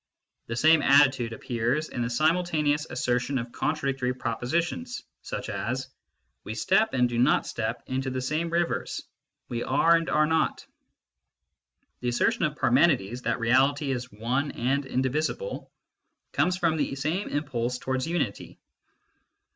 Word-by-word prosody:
The 115 Hz, -, -3 dB
same 160 Hz, +5 st, +5 dB
attitude 135 Hz, -4 st, +4 dB
appears 120 Hz, +6 st, -1 dB
in 120 Hz, -, -4 dB
the 115 Hz, -, -1 dB
simultaneous 155 Hz, +1 st, +1 dB
assertion 125 Hz, +2 st, 0 dB
of 120 Hz, -1 st, -4 dB
contradictory 135 Hz, -4 st, -1 dB
pro 120 Hz, -2 st, -2 dB
positions, 170 Hz, -, -2 dB, 0.2 s
such -, -, -5 dB
as: 130 Hz, +3 st, -3 dB, 0.3 s
" -, -, -50 dB
We 110 Hz, -, -6 dB
step 195 Hz, -, +2 dB
and 125 Hz, -1 st, +4 dB
do 120 Hz, -1 st, -2 dB
not 125 Hz, -, +3 dB
step 115 Hz, +1 st, -3 dB
into 130 Hz, +1 st, -2 dB
the 130 Hz, 0 st, -2 dB
same 155 Hz, +6 st, -1 dB
rivers; 170 Hz, 0 st, -1 dB, 0.4 s
we 120 Hz, -1 st, -3 dB
are 165 Hz, +7 st, +4 dB
and 165 Hz, 0 st, 0 dB
are 150 Hz, 0 st, +3 dB
not." 160 Hz, 0 st, 0 dB, 1.3 s
The 125 Hz, -, -1 dB
assertion 120 Hz, +8 st, +1 dB
of 150 Hz, -1 st, -2 dB
Par 130 Hz, -4 st, +1 dB
menides, 125 Hz, -, +3 dB
that -, -, 0 dB
reality 135 Hz, +5 st, +2 dB
is 125 Hz, -1 st, -4 dB
one 125 Hz, +7 st, -1 dB
and 135 Hz, +3 st, 0 dB
indivisible, 150 Hz, -, -2 dB, 0.6 s
comes 180 Hz, 0 st, +1 dB
from 165 Hz, -3 st, +1 dB
the 140 Hz, -, -1 dB
same 155 Hz, +9 st, -2 dB
impulse 125 Hz, -4 st, -2 dB
towards 130 Hz, +1 st, -2 dB
unity. 160 Hz, -12 st, -3 dB
135 Hz, 145 wpm, -27 LUFS, 125-155 Hz, 1.3 s, same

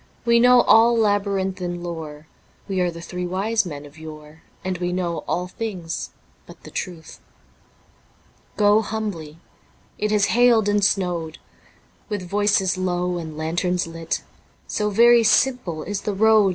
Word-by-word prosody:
We 235 Hz, 0 st, +4 dB
know 250 Hz, +1 st, +6 dB
all 230 Hz, +1 st, +5 dB
labyrinthine 195 Hz, -4 st, -1 dB
lore, 160 Hz, -3 st, -7 dB, 0.4 s
We 190 Hz, -2 st, -1 dB
are 180 Hz, -, +1 dB
the 170 Hz, 0 st, -8 dB
three 180 Hz, +1 st, -5 dB
Wise 200 Hz, +3 st, 0 dB
Men 145 Hz, -3 st, -7 dB
of 145 Hz, +2 st, -15 dB
yore, 155 Hz, 0 st, -11 dB, 0.2 s
And 185 Hz, -2 st, -2 dB
we 175 Hz, 0 st, -1 dB
know 175 Hz, -2 st, -2 dB
all 180 Hz, -, -1 dB
things 180 Hz, -5 st, -5 dB, 0.4 s
but -, -, -15 dB
the -, -, -11 dB
truth. 170 Hz, -4 st, -6 dB, 1.4 s
Go 210 Hz, +1 st, +4 dB
humbly... 200 Hz, -9 st, -5 dB, 0.6 s
it 210 Hz, -, 0 dB
has 210 Hz, -1 st, +2 dB
hailed 235 Hz, -3 st, +4 dB
and 205 Hz, 0 st, +2 dB
snowed... 175 Hz, -5 st, 0 dB, 0.7 s
With 205 Hz, -4 st, -4 dB
voices 200 Hz, -1 st, +1 dB
low 180 Hz, -1 st, -1 dB
and 160 Hz, -2 st, -7 dB
lanterns 175 Hz, +3 st, -1 dB
lit, 165 Hz, 0 st, -4 dB, 0.4 s
So 210 Hz, 0 st, -1 dB
very 235 Hz, +3 st, +6 dB
simple 220 Hz, -8 st, +1 dB
is 200 Hz, +1 st, -4 dB
the 210 Hz, -, -3 dB
road. 215 Hz, -1 st, +5 dB
185 Hz, 145 wpm, -22 LUFS, 170-210 Hz, 1.4 s, know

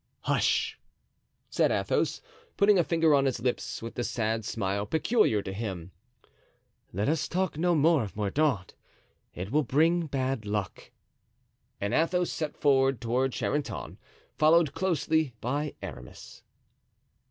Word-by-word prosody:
"Hush!" -, -, +1 dB, 0.7 s
said -, -, +2 dB
Athos, -, -, 0 dB, 0.3 s
putting 200 Hz, -1 st, +5 dB
a -, -, +4 dB
finger 165 Hz, -2 st, +2 dB
on 140 Hz, -1 st, +4 dB
his 135 Hz, -, 0 dB
lips, 115 Hz, -5 st, -3 dB
with 115 Hz, -, -6 dB
the 120 Hz, -, -3 dB
sad 115 Hz, -2 st, -1 dB
smile 100 Hz, -1 st, -2 dB
peculiar 160 Hz, -, +2 dB
to 95 Hz, -, -5 dB
him; 95 Hz, -5 st, -5 dB, 1.0 s
"let 100 Hz, +4 st, -1 dB
us 155 Hz, +1 st, 0 dB
talk 185 Hz, -1 st, -1 dB
no 175 Hz, +3 st, +2 dB
more 155 Hz, 0 st, +4 dB
of 105 Hz, -3 st, -6 dB
Mordaunt—it 100 Hz, -, -4 dB
will 150 Hz, +3 st, +3 dB
bring 160 Hz, +5 st, +2 dB
bad 135 Hz, -4 st, -2 dB
luck." 105 Hz, -2 st, -4 dB, 0.9 s
And 100 Hz, +3 st, -2 dB
Athos 175 Hz, +4 st, +1 dB
set 155 Hz, -2 st, -4 dB
forward 135 Hz, -3 st, +3 dB
toward 125 Hz, +3 st, 0 dB
Charenton, 145 Hz, 0 st, -3 dB, 0.4 s
followed 155 Hz, -1 st, +4 dB
closely 160 Hz, -6 st, 0 dB
by 145 Hz, +6 st, -2 dB
Aramis. 60 Hz, 0 st, -10 dB
135 Hz, 130 wpm, -28 LUFS, 110-160 Hz, 1.0 s, putting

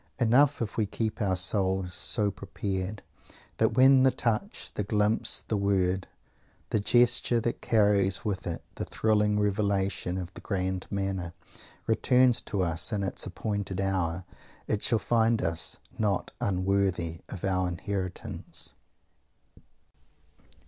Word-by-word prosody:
Enough 130 Hz, +3 st, +4 dB
if 105 Hz, -, -6 dB
we 110 Hz, -2 st, +1 dB
keep 110 Hz, +2 st, -3 dB
our 95 Hz, -3 st, +1 dB
souls 95 Hz, 0 st, +1 dB
so 105 Hz, +2 st, +1 dB
prepared 95 Hz, +1 st, -4 dB, 0.5 s
that -, -, +2 dB
when 130 Hz, +1 st, +7 dB
the 130 Hz, -, +6 dB
touch, 125 Hz, -, -2 dB
the 105 Hz, -, -2 dB
glimpse, 105 Hz, +2 st, +1 dB
the 110 Hz, -, 0 dB
word, 95 Hz, -2 st, +1 dB, 0.6 s
the 110 Hz, -, +2 dB
gesture, 120 Hz, +2 st, +3 dB
that 115 Hz, +1 st, -2 dB
carries 100 Hz, -4 st, +2 dB
with 100 Hz, -4 st, -2 dB
it 85 Hz, -, -4 dB
the -, -, -4 dB
thrilling 105 Hz, -1 st, +1 dB
revelation 100 Hz, -3 st, 0 dB
of 90 Hz, 0 st, -6 dB
the -, -, -10 dB
"grand 95 Hz, -2 st, -2 dB
manner", 95 Hz, -3 st, -3 dB, 0.5 s
returns 125 Hz, +1 st, +3 dB
to 100 Hz, -3 st, -2 dB
us 85 Hz, +3 st, +1 dB
in 105 Hz, -2 st, -1 dB
its 95 Hz, -, -2 dB
appointed 100 Hz, -1 st, -3 dB
hour, 95 Hz, -2 st, -1 dB, 0.4 s
it 105 Hz, -, -1 dB
shall 115 Hz, -, +3 dB
find 115 Hz, 0 st, +2 dB
us 80 Hz, 0 st, 0 dB, 0.2 s
not 105 Hz, -3 st, 0 dB
unworthy 95 Hz, -3 st, 0 dB
of 95 Hz, -, -7 dB
our 95 Hz, -1 st, +1 dB
inheritance. 95 Hz, +1 st, -4 dB
100 Hz, 130 wpm, -28 LUFS, 95-110 Hz, 0.6 s, when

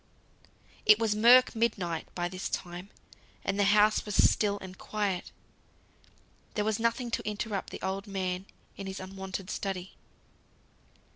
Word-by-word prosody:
It 215 Hz, -, +7 dB
was 220 Hz, -2 st, +1 dB
murk 245 Hz, +4 st, +7 dB
midnight 185 Hz, -8 st, -1 dB
by 175 Hz, -1 st, -1 dB
this 185 Hz, +1 st, -4 dB
time, 180 Hz, +1 st, -5 dB, 0.6 s
and 195 Hz, +1 st, -1 dB
the 200 Hz, -, +4 dB
house 210 Hz, +1 st, +4 dB
was 210 Hz, -2 st, -4 dB
still 205 Hz, -1 st, +4 dB
and 190 Hz, -1 st, -9 dB
quiet. 200 Hz, -3 st, -2 dB, 1.2 s
There 210 Hz, -, 0 dB
was 220 Hz, 0 st, 0 dB
nothing 230 Hz, +1 st, 0 dB
to -, -, -1 dB
interrupt 210 Hz, -1 st, -3 dB
the -, -, -8 dB
old 195 Hz, +2 st, -2 dB
man 190 Hz, -1 st, -3 dB, 0.3 s
in 195 Hz, -, -6 dB
his 190 Hz, 0 st, -5 dB
unwonted 190 Hz, 0 st, -6 dB
study. 190 Hz, -2 st, -4 dB
195 Hz, 140 wpm, -30 LUFS, 190-215 Hz, 1.2 s, It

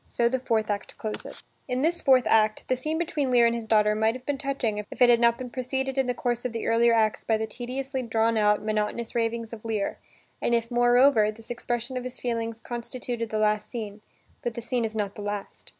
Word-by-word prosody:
So 235 Hz, -, +2 dB
the 260 Hz, +2 st, 0 dB
fourth 225 Hz, -4 st, 0 dB
act 200 Hz, -1 st, -5 dB
closes. 215 Hz, -2 st, -6 dB, 0.2 s
In 255 Hz, +1 st, -1 dB
this 340 Hz, +2 st, +1 dB
fourth 260 Hz, -3 st, +5 dB
act, 215 Hz, -1 st, +2 dB
the 255 Hz, -, +2 dB
scene 305 Hz, +5 st, -2 dB
between 315 Hz, -5 st, -1 dB
Lear 240 Hz, -2 st, +5 dB
and 235 Hz, -, +3 dB
his 230 Hz, -1 st, -4 dB
daughter 210 Hz, -1 st, +4 dB
might 220 Hz, +2 st, +1 dB
have 255 Hz, 0 st, -10 dB
been 285 Hz, -1 st, -2 dB
touching 270 Hz, -6 st, -1 dB
if 210 Hz, -, -8 dB
it 245 Hz, -1 st, +7 dB
had 235 Hz, -, +5 dB
not 235 Hz, 0 st, +4 dB
been 250 Hz, -1 st, -7 dB
preceded 265 Hz, +1 st, -2 dB
in 265 Hz, -2 st, +1 dB
the 250 Hz, -, 0 dB
course 240 Hz, -1 st, -1 dB
of 250 Hz, -2 st, -3 dB
the 230 Hz, -, -3 dB
earlier 235 Hz, +1 st, +4 dB
acts 220 Hz, -2 st, +2 dB
by 220 Hz, -, +1 dB
the 220 Hz, -, -2 dB
tediously 260 Hz, +4 st, -4 dB
drawn 230 Hz, -1 st, +1 dB
out, 210 Hz, -1 st, +3 dB
monotonous 215 Hz, +2 st, -2 dB
ravings 230 Hz, -1 st, -1 dB
of 215 Hz, -, -8 dB
Lear, 220 Hz, -3 st, -2 dB, 0.4 s
and 235 Hz, -, +2 dB
if, 230 Hz, 0 st, -1 dB
moreover, 245 Hz, -2 st, +5 dB
this 220 Hz, +2 st, -8 dB
expression 240 Hz, +1 st, -3 dB
of 250 Hz, -, -3 dB
his 255 Hz, 0 st, -6 dB
feelings 230 Hz, -2 st, -2 dB
constituted 240 Hz, -1 st, -4 dB
the 215 Hz, -, -2 dB
last 210 Hz, 0 st, +1 dB
scene. 215 Hz, -3 st, -6 dB, 0.4 s
But 240 Hz, -1 st, -3 dB
the 235 Hz, -, -4 dB
scene 240 Hz, 0 st, 0 dB
is 220 Hz, 0 st, -5 dB
not 205 Hz, -2 st, -2 dB
the 210 Hz, -, -8 dB
last. 205 Hz, -1 st, -6 dB
235 Hz, 230 wpm, -26 LUFS, 220-250 Hz, 0.4 s, it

